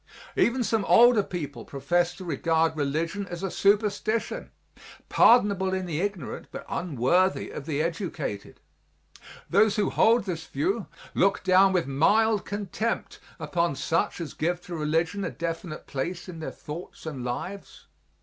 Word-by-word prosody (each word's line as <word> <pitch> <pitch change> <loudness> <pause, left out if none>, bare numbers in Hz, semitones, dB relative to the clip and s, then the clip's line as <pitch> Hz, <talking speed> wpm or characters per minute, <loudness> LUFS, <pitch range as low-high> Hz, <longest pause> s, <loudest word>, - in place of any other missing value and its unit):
Even 245 +1 +2
some 225 -2 +1
older 240 -2 +6
people 170 -7 -6
profess 175 +6 0
to 185 - -9
regard 160 +1 +1
religion 160 +7 -2
as 175 +1 -6
a 190 - -2
superstition, 210 +2 +1 0.6
pardonable 200 -5 +4
in 185 -1 -2
the 165 -2 -2
ignorant 195 -8 -4
but - - -8
unworthy 175 +4 +1
of 145 - -7
the 150 -1 0
educated. 165 - -4 0.9
Those 205 +2 +4
who 205 -2 +1
hold 230 0 +4
this 170 -4 -4
view 195 +10 -1 0.3
look 195 +1 +2
down 190 +1 +5
with 180 -3 +1
mild 205 +10 +3
contempt 205 +3 -3 0.2
upon 165 0 0
such 165 +6 0
as 165 -3 -5
give 175 +3 -1
to 175 -1 -7
religion 165 +5 0
a - - -1
definite 165 -1 -5
place 170 +7 -4
in 170 -3 -8
their 160 - -4
thoughts 160 +4 -9
and 140 -6 -5
lives. 180 +11 -6
175 Hz, 145 wpm, -26 LUFS, 160-200 Hz, 0.9 s, older